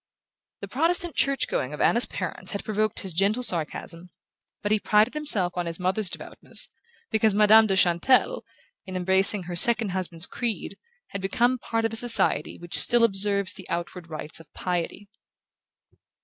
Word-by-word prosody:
The - - -7
Protestant 335 +4 0
church 275 -1 0
going 130 +3 -4
of - - -14
Anna's 235 - +3
parents - - -7
had 200 - -5
provoked 215 0 -2
his 190 -3 -7
gentle 200 +8 0
sarcasm; 170 -1 -1 0.5
but 205 - -3
he 215 - +2
prided 210 +3 +1
himself 220 -13 0
on 175 -1 -4
his 165 +1 -4
mother's 185 +2 -1
devoutness, - - -3 0.4
because 220 -2 +1
Madame 215 +1 +5
de 195 - -1
Chantelle, 190 - +1 0.4
in 185 - -8
embracing 190 +2 +4
her 175 0 -7
second 225 +3 +6
husband's 180 -2 -2
creed, 235 -3 -5 0.3
had 200 - -7
become 240 +6 0
part 225 -1 -3
of 225 - -3
a - - -4
society 230 -10 +3
which 175 0 -3
still 240 -1 +2
observes 200 -2 +1
the 190 - -11
outward 170 0 -6
rites 155 0 -7
of 160 -2 -18
piety. 180 +3 -5
200 Hz, 165 wpm, -24 LUFS, 180-225 Hz, 0.5 s, second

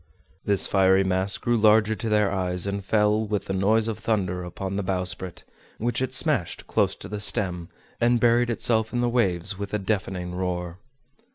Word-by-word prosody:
This 100 -2 +2
fiery 95 0 +3
mass 95 +1 +2
grew 120 - 0
larger 110 0 +4
to 110 +1 -4
their 105 -2 +2
eyes, 90 -2 -1
and 100 0 -3
fell, 105 +1 +2
with 105 -1 -3
the 95 - -3
noise 105 +4 +2
of 110 - -4
thunder, 90 -5 -1
upon 95 +2 -5
the 100 - -1
bowsprit, 90 -1 -3 0.3
which 120 +3 -2
it 130 -1 -1
smashed 135 - -1
close - - 0
to - - -10
the 105 - -5
stem, 90 -4 -1 0.3
and 120 0 +3
buried 120 +1 +3
itself 110 -1 0
in 120 - 0
the 120 - +1
waves 100 -5 +1
with 100 +1 -4
a - - +2
deafening 95 -3 -3
roar! 90 -1 -4
100 Hz, 185 wpm, -25 LUFS, 95-110 Hz, 0.3 s, larger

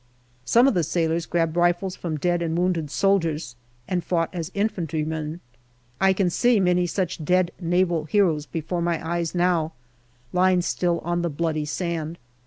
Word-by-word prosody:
Some 235 - +5
of 275 - +3
the 175 - +2
sailors 165 +1 0
grabbed 165 -2 0
rifles 175 +2 +1
from 160 -3 -4
dead 175 +3 0
and 165 0 -1
wounded 175 -4 0
soldiers 165 -8 0 0.3
and 180 -2 -1
fought 165 -2 0
as 170 -2 -4
infantrymen. 160 -5 -2 0.6
I 190 0 +5
can 190 -2 +1
see 240 +5 +3
many 180 -1 +2
such 180 -2 -2
dead 180 +2 +2
Naval 175 -2 +1
heroes 160 -5 +2
before 170 +1 -3
my 170 -1 -1
eyes 170 0 -2
now, 175 -3 +1 0.6
lying 180 0 +3
still 175 -1 0
on 175 0 -1
the 170 - -1
bloody 155 0 -1
sand. 165 0 -3
170 Hz, 160 wpm, -24 LUFS, 160-180 Hz, 0.6 s, Some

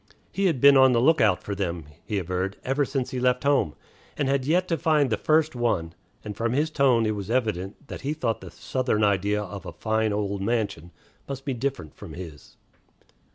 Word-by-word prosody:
He 195 0 +1
had 160 -8 0
been 140 +2 +7
on 130 -1 +6
the 120 - +3
lookout 115 - +3
for 100 - -4
them, 85 -5 -3 0.2
he 105 - -3
averred, 95 +1 -2
ever 135 +2 +1
since 135 -1 -3
he 130 - -3
left 125 0 +1
home, 140 - +2 0.4
and 145 - 0
had 135 -1 +1
yet 180 +5 +2
to 165 - +1
find 150 -6 +2
the - - +3
first 155 +5 +2
one; 100 -9 -1 0.3
and 105 -1 -6
from 115 +3 -1
his 150 +4 +1
tone 130 -6 +3
it 110 - +1
was 100 0 -6
evident 110 0 -2
that - - -7
he 140 +3 -2
thought 115 -9 -2
the - - -9
Southern 125 -5 -1
idea 105 +1 +1
of 100 -1 -8
a 90 - -7
"fine 110 +4 0
old 100 -1 -2
mansion" 100 -6 -2 0.4
must 135 -1 -6
be 135 - -1
different 125 - -4
from - - -11
his. 85 -5 -10
115 Hz, 205 wpm, -25 LUFS, 100-140 Hz, 0.4 s, been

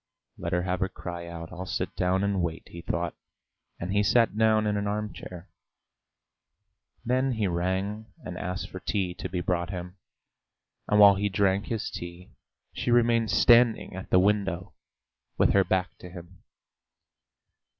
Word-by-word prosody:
"Let 85 0 -5
her 90 0 +1
have 90 0 -1
her 95 0 0
cry 85 -2 -7
out. 85 0 -8
I'll 90 +1 -7
sit 90 - -3
down 95 +1 +1
and 100 -2 0
wait," 85 -1 -3
he 85 - -9
thought, 85 0 -2 0.7
and 90 +3 -3
he 100 - +3
sat 115 +2 +3
down 110 0 +3
in 105 -1 +1
an 100 0 -1
arm 105 0 -2
chair. 90 +1 -10 1.6
Then 130 +2 +1
he 110 -3 -1
rang 95 +4 -2 0.2
and 90 - -6
asked 90 0 -4
for 95 - -6
tea 95 -1 -1
to - - -6
be 90 0 -2
brought 85 0 -1
him, 90 0 -6 0.9
and 105 - +3
while 100 -1 +9
he 100 +1 -1
drank 100 0 +1
his 115 -3 -3
tea 85 +1 -8 0.4
she - - -3
remained 115 -2 +3
standing 115 +2 +4
at 95 - -7
the - - +4
window 100 -2 +1 0.6
with - - +4
her 100 - +5
back 95 -1 -1
to 90 - -10
him. 90 0 -12
95 Hz, 165 wpm, -27 LUFS, 90-105 Hz, 1.6 s, while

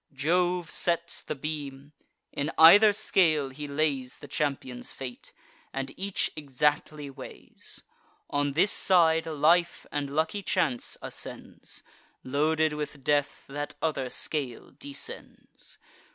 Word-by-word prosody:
Jove 175 +4 +1
sets 170 0 0
the - - -5
beam; 145 -1 -6 0.4
in 145 +2 -2
either 200 +7 +9
scale 160 -8 +2
he 145 +3 -7
lays 140 -3 -1
The 145 - -11
champions' 135 -4 -3
fate, 125 -2 -8 0.4
and 135 0 -4
each 195 0 -1
exactly 150 0 -1
weighs. - - -9 0.4
On 145 0 0
this 180 +7 +4
side, 165 -3 +4
life 165 +3 +2
and 145 -1 -2
lucky 160 +7 -1
chance 160 -11 0
ascends; - - -7 0.4
Loaded 155 +3 +1
with 150 -2 -5
death, 145 0 0
that 145 +2 -5
other 145 -5 -1
scale 135 -3 -3
descends. 285 0 -9
150 Hz, 115 wpm, -28 LUFS, 140-165 Hz, 0.4 s, either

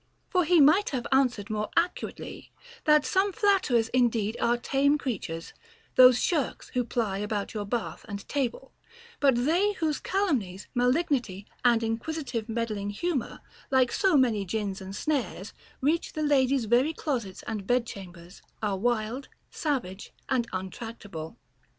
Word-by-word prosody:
For 365 -3 +3
he 345 +1 +5
might 310 +8 +5
have 255 -4 -3
answered 245 -6 +2
more 210 0 -2
accurately, 340 +2 -2 0.3
that 300 -1 +5
some 395 +1 +2
flatterers 375 - +2
indeed 230 -4 +1
are 235 +1 +3
tame 280 +4 +2
creatures, 185 - -4 0.4
those 250 -1 +8
shirks 315 -6 -1
who 250 - 0
ply 220 -4 -1
about 210 -1 -3
your 210 -2 -3
bath 230 +3 -3
and 200 - -3
your - - -13
table; 270 -1 -3 0.5
bat 275 -3 +4
they 340 +12 +2
whose 315 -5 -1
calum 385 -8 +1
nies, 190 -1 -9
malignity, 250 - +1 0.2
and 235 -2 +4
inquisitive 230 0 -3
meddling 220 -3 -2
humor, 275 +6 -3 0.3
like 260 -2 +3
so 380 -6 +3
many 230 -6 +3
gins 195 0 -3
and 190 +1 -7
snares, 255 - -2 0.3
reach 310 +5 +1
the 310 - -2
ladies' 270 -3 +3
very 250 +8 +3
closets 240 -13 -3
and 210 -3 -5
bed 245 -1 +2
chambers, 180 -4 -10 0.2
are 205 -3 -1
wild, 240 +4 -1 0.2
savage, 240 - -3 0.2
and 250 -3 +1
untractable. 190 -3 -6
245 Hz, 145 wpm, -28 LUFS, 210-290 Hz, 0.5 s, those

